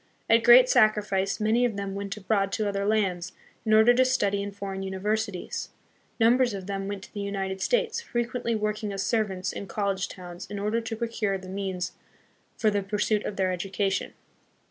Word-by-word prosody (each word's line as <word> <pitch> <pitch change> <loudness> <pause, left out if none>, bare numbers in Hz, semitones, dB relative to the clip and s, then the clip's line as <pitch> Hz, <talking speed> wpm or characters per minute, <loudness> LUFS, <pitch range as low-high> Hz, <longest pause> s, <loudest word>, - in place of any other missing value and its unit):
At 230 0 +4
great 245 +2 +8
sacrifice 205 -4 +2
many 220 +3 +2
of 230 -4 0
them 200 -1 -3
went 200 +1 -4
abroad 195 -1 0
to 215 -2 0
other 200 0 -1
lands, 185 -4 0 0.3
in 220 - -1
order 220 +2 +7
to 255 +1 +4
study 205 -6 +1
hi 200 - -4
foreign 195 -1 -6
uni 190 0 -4
versities. 210 -1 -2 0.5
Numbers 240 0 +4
of 190 -2 -6
them 195 0 -3
went 200 -1 -5
to - - -14
the 205 - -5
United 195 -1 -3
States, 480 -2 +1
frequently 240 - -2
working 210 0 -2
as 195 -1 -2
servants 200 -5 -1
in 200 - -6
college 195 -2 -1
towns 175 0 -9
in 205 - -5
order 210 +3 0
to 225 0 -4
procure 225 -3 -1
the 185 -1 -11
means 190 -2 -3 0.7
for 215 -2 +2
the 205 -1 0
pursuit 210 +1 0
of 205 - -3
their 190 -1 +1
education. 190 +1 -2
205 Hz, 190 wpm, -27 LUFS, 195-220 Hz, 0.7 s, great